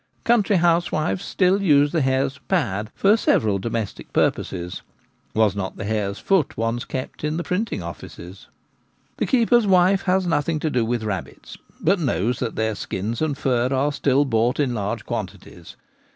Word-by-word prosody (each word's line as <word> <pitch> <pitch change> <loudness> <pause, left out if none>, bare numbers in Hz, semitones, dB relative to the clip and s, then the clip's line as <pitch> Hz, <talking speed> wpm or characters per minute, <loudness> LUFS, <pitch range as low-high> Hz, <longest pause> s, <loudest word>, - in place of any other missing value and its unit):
Country 225 -3 +3
housewives 165 - +1
still 190 +1 +2
use 145 -5 +4
the 165 - +1
hare's 135 +1 0
'pad' 110 - -1
for 200 +2 +4
several 105 - +2
domestic 110 0 -4
purposes 90 -1 -1 0.3
— - - -41
was 110 -2 +3
not 95 -2 -4
the - - -5
hare's 105 -2 -2
foot 190 -7 +1
once 115 +2 -1
kept 130 +2 -6
in 150 +1 -1
the 175 - -2
printing 180 - -2
offices? 85 +2 -10 0.7
The - - -1
keeper's 240 -3 +3
wife 185 +1 +4
has 185 0 +2
nothing 160 -1 0
to 155 - -1
do 125 -4 +1
with 115 0 -1
rabbits,, 105 -5 -6 0.2
but 190 +4 +2
knows 120 - 0
that 120 -3 -3
their 110 0 0
skins 105 +3 -4
and 150 -3 0
fur 125 -3 +1
are 135 +2 +1
still 140 0 +2
bought 120 0 +1
in 135 -4 +1
large 105 0 -3
quantities. 95 -4 -7
130 Hz, 165 wpm, -22 LUFS, 110-170 Hz, 0.7 s, use